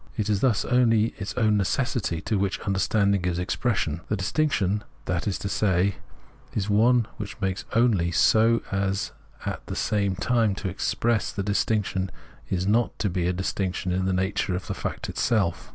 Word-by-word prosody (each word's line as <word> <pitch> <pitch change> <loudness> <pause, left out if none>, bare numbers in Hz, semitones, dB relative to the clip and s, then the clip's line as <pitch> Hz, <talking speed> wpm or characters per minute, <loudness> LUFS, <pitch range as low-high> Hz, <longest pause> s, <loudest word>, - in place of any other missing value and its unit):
It 110 -1 0
is 100 - +2
thus 110 -5 +2
only 115 -3 +3
its 95 - -5
own 110 -4 +3
necessity 100 -4 0
to 105 -3 -1
which 100 +1 -1
un.derstanding 100 0 +1
gives 90 -1 -1
expression 90 -3 -1
— - - -29
the 105 - +1
distinction, 105 -2 0 0.2
that 90 -1 -1
is 100 - 0
to - - -4
say, 95 -1 +1 0.6
is 100 -2 -1
one 115 +3 +4
which 105 -1 -5
it - - -23
makes 95 0 -1
only 110 -7 +3
so 110 +6 +4
as 95 0 -1 0.3
at - - -4
the - - -4
same 100 -3 0
time 110 0 +1
to 95 - -3
express 110 +4 0
that 100 - -2
the 100 - -1
distinction 100 -3 0 0.4
is 90 0 0
not 115 +4 +1
to 100 - -1
be 90 -1 0
a 90 - +1
distinction 95 0 -2
in 95 +1 0
the 95 - +1
nature 95 0 0
of 90 - -4
the - - -3
fact - - -4
itself. 100 -8 0
100 Hz, 185 wpm, -25 LUFS, 95-110 Hz, 0.6 s, one